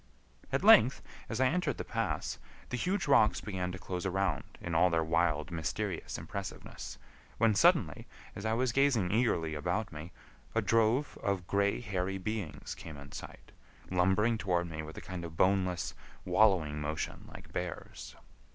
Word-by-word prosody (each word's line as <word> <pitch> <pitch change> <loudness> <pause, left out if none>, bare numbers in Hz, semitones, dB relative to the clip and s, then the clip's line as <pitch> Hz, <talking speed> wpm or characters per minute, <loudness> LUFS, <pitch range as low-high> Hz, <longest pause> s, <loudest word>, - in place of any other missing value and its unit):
At - - 0
length, - - +7 0.3
as 115 - -3
I 130 - +4
entered 155 -1 +1
the - - -3
pass, - - -2 0.3
the - - -2
huge 180 - -1
rocks 110 -6 +5
began 90 -3 -3
to 95 - -6
close 90 0 -4
around 95 -6 -1
in 85 - -5
all 85 +3 +5
their 80 -1 +2
wild, 80 -2 +1
mysterious 85 +4 -3
impressiveness, 100 -1 -7 0.4
when 115 -1 +4
suddenly, 100 - +3 0.3
as 100 - -6
I 110 0 +1
was 125 +1 +1
gazing 120 -8 +3
eagerly 105 -9 +1
about 90 +7 -1
me, 80 +2 -8 0.4
a - - +3
drove 115 +5 +2
of 95 -3 -1
gray 100 +4 +1
hairy 95 -3 -2
beings 100 -4 -4
came 80 -3 -9
in 70 0 -11
sight, - - -10 0.4
lumbering 95 +5 +3
toward 90 -4 0
me 80 -1 -5
with 80 +1 -9
a - - -6
kind 90 -2 -6
of 80 -1 -8
boneless, 95 -2 +2 0.3
wallowing 90 -9 +3
motion 75 +1 -4
like - - -12
bears. 90 -1 -5
95 Hz, 160 wpm, -32 LUFS, 85-110 Hz, 0.4 s, length